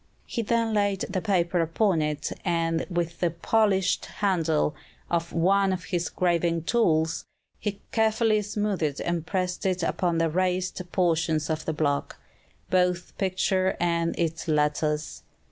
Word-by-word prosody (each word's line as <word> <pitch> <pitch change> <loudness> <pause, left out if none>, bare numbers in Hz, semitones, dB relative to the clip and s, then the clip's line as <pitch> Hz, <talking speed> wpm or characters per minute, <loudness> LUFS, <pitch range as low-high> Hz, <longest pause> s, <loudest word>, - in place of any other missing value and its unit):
He 235 - -3
then 230 0 +1
laid 205 -2 +1
the 190 -1 -2
paper 175 -4 +1
upon 165 +1 +1
it, 150 -1 -2
and, 165 -2 0
with 170 -2 -2
the 175 - +2
polished 190 +2 +1
handle 165 -7 +1 0.4
of 170 0 0
one 195 +3 +3
of 185 -2 -2
his 175 -1 -2
graving 170 -2 +1
tools, 165 -7 +1 0.7
carefully 220 -1 +2
smoothed 200 -8 -1
and 170 -2 -2
pressed 180 -2 -2
it 185 -2 0
upon 170 0 0
the 165 -1 +1
raised 185 +1 0
portions 165 -3 +1
of 155 0 -3
the 160 - -1
block, 145 -2 -1 0.5
both 180 -1 +1
picture 190 0 +1
and 170 -1 0
its 165 -1 -2
letters. 150 0 0
175 Hz, 135 wpm, -26 LUFS, 165-190 Hz, 0.7 s, one